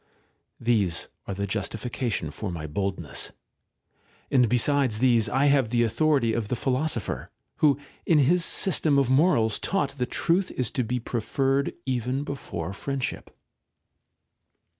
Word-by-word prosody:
These 105 -8 +1 0.2
are 100 - -3
the 100 +1 -2
justification 110 - -3
for 100 +5 -5
my 80 -3 -5
boldness. 90 0 -3 1.0
And 125 -4 +4
besides 125 -1 +2
these 120 -2 +3
I 135 +3 +2
have 140 -5 +3
the 120 0 +2
authority 120 0 +2
of 110 -2 -1
the 125 - -1
Philosopher, 130 -1 -2 0.3
who 145 -4 +4 0.3
in 165 - +5
his 165 +5 +4
system 160 -6 +2
of 135 -2 +2
morals 130 -7 +3
taught 185 -8 0
that 125 - -1
truth 180 +3 +1
is 125 -3 -2
to 125 - 0
be 125 +2 -2
preferred 135 +4 0
even 130 +1 -1
before 95 - -5
friendship. 135 +5 -4
125 Hz, 135 wpm, -26 LUFS, 110-140 Hz, 1.0 s, in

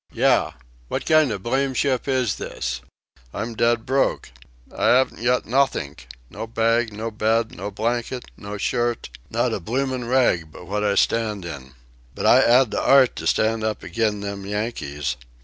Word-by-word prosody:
Yah! - - +2 0.3
What - - -3
kind 155 -5 +4
of 100 -3 -5
blamed 130 +1 0
ship 135 -3 0
is 130 -7 0
this? 60 - -4 0.5
I'm 110 +3 -3
dead 115 0 +1
broke. 135 - 0 0.4
I - - +2
'aven't 130 -2 +2
got 125 +1 +2
nothink. 110 - 0 0.2
No 110 - -7
bag, 115 0 +1
no 110 +2 -5
bed, 110 +1 0
no 100 +3 -5
blanket, 120 +4 -2
no 105 0 -7
shirt 120 +2 -1 0.2
not - - 0
a - - -2
bloomin' 130 +4 -2
rag 120 -11 +2
but 90 - -12
what 105 +3 -2
I 100 -1 +1
stand 105 -5 +1
in. 65 -5 -8 0.4
But - - -4
I - - +7
'ad 120 -1 +4
the - - -1
'art 135 -3 +5
to - - -3
stand 110 0 +1
up 110 -1 -2
agin' 105 +2 -1
them 100 -1 -5
Yankees. 85 - -3
115 Hz, 165 wpm, -23 LUFS, 100-125 Hz, 0.5 s, I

